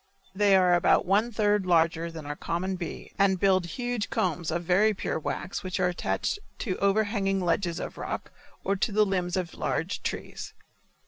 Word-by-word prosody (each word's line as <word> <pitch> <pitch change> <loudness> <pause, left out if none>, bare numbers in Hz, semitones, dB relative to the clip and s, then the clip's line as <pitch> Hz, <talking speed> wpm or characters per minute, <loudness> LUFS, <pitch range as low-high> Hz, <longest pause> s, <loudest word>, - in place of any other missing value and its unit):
They 200 0 +4
are 180 -2 +5
about 175 - +4
one 205 +6 +2
third 205 -3 +1
larger 165 -1 +2
than 160 -2 -8
our 145 0 -4
common 185 +5 -2
bee 175 -3 -6
and 195 -2 +3
build 185 -2 +3
huge 245 +3 -3
combs 175 -2 -1
of 170 +1 -1
very 205 +5 +3
pure 160 - -2
wax 175 +4 -4
which 185 0 -3
are 180 -1 +3
attached 180 - -1 0.2
to 190 -6 -2
overhanging 200 -1 +1
ledges 175 -1 0
of - - -6
rock - - -5 0.3
or 195 - +1
to 205 +3 0
the 210 +1 +4
limbs 180 -2 -1
of 175 -3 -3
large - - -2
trees. - - -5
185 Hz, 180 wpm, -27 LUFS, 175-200 Hz, 0.3 s, are